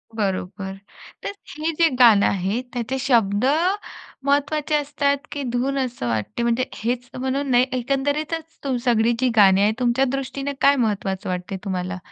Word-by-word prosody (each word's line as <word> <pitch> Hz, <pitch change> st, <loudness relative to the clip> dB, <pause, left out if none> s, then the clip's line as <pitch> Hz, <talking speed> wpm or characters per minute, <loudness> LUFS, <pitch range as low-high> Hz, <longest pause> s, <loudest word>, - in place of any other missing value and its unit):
बरोबर 190 Hz, -1 st, -3 dB, 0.5 s
तर -, -, -3 dB, 0.3 s
हे 320 Hz, +2 st, 0 dB
जे 335 Hz, -, +6 dB
गाणं 220 Hz, -5 st, +7 dB
आहे 195 Hz, +5 st, 0 dB
त्याचे 245 Hz, +2 st, -2 dB
शब्द 230 Hz, -4 st, +2 dB, 0.8 s
महत्त्वाचे 290 Hz, +2 st, +1 dB
असतात 285 Hz, -1 st, +1 dB
की 285 Hz, -1 st, -4 dB
धून 270 Hz, +3 st, 0 dB
असं 245 Hz, -, -2 dB
वाटते 115 Hz, -, -2 dB
म्हणजे 235 Hz, +2 st, +1 dB
हेच 245 Hz, +2 st, -3 dB
म्हणून 265 Hz, +2 st, -1 dB
नाही 245 Hz, +1 st, +5 dB
एकंदरीतच 285 Hz, +1 st, -2 dB
सगळी 235 Hz, -1 st, +3 dB
जी 255 Hz, -1 st, +2 dB
गाणी 195 Hz, -2 st, +6 dB
आहेत 210 Hz, +2 st, +3 dB
तुमच्या 250 Hz, +2 st, +2 dB
दृष्टीने 275 Hz, +1 st, -3 dB
काय 280 Hz, +1 st, +6 dB
महत्त्वाचं 200 Hz, -6 st, -1 dB
वाटते 180 Hz, +1 st, -3 dB
तुम्हाला? 185 Hz, -1 st, -3 dB
245 Hz, 145 wpm, -22 LUFS, 205-275 Hz, 0.8 s, गाणं